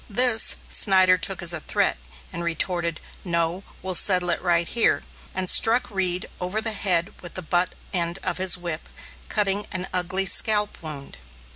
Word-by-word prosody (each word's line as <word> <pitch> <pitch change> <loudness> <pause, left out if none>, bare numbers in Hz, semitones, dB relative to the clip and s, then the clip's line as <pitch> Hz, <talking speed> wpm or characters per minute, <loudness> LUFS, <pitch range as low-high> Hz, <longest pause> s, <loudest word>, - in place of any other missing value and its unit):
This, 230 +1 +4
Synder 185 -2 +4
took 190 -1 -1
as 170 0 +4
a - - -1
threat, - - -1 0.4
and 170 - -5
retorted, 170 0 -2 0.2
"No, 170 0 -2 0.2
we'll 190 0 -2
settle 180 -1 +4
it - - -2
right 170 -1 0
here," 235 - 0 0.3
and 185 0 -2
struck 230 +5 +4
Reed 185 -2 +1
over 185 +4 -3
the 220 0 -3
head 180 -4 -1
with 175 - -12
the 185 - -6
butt 175 +2 -1 0.2
end 170 -1 -1
of - - -3
his 185 -1 +4
whip, 170 -2 -7 0.4
cutting 205 -1 -1
an 185 -1 -4
ugly 185 +1 -2
scalp 210 +2 +3
wound. 150 - -10
185 Hz, 165 wpm, -23 LUFS, 170-195 Hz, 0.4 s, This